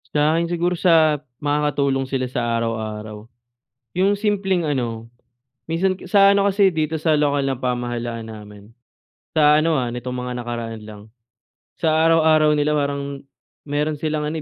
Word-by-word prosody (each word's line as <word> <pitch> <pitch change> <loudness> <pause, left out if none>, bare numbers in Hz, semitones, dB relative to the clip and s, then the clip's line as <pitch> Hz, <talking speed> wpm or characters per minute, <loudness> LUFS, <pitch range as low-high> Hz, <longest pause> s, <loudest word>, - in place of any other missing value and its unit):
Sa 150 +1 +3
akin 170 +1 +1
siguro 175 0 -1
sa 160 -4 +4 0.2
makakatulong 145 -2 0
sila 130 -1 -2
sa 120 -2 -1
araw-araw, 110 -2 -4 0.7
yung 195 +2 +2
simpleng 195 -5 0
ano, 115 -5 -3 0.6
minsan 185 +3 +1
ke 185 - -12
sa 200 -1 +6
ano 200 0 +3
kasi 195 -2 +3
dito 155 0 -1
sa 155 0 +2
lokal 145 -2 +1
na 135 - 0
pamahalaan 120 -2 -3
namin. 105 0 -12 0.6
Sa 150 0 +5
ano, 160 0 +1
ah, 125 -3 -1
nitong 125 +1 -5
mga 125 - -4
nakaraan 115 -2 -5
lang. 105 -1 -10 0.8
Sa 160 -2 +1
araw-araw 160 -1 +4
nila 150 +1 +1
parang 140 -1 -2 0.4
meron 150 +1 -1
silang 155 -1 -1
ano, 150 - -3
145 Hz, 150 wpm, -21 LUFS, 120-160 Hz, 0.8 s, sa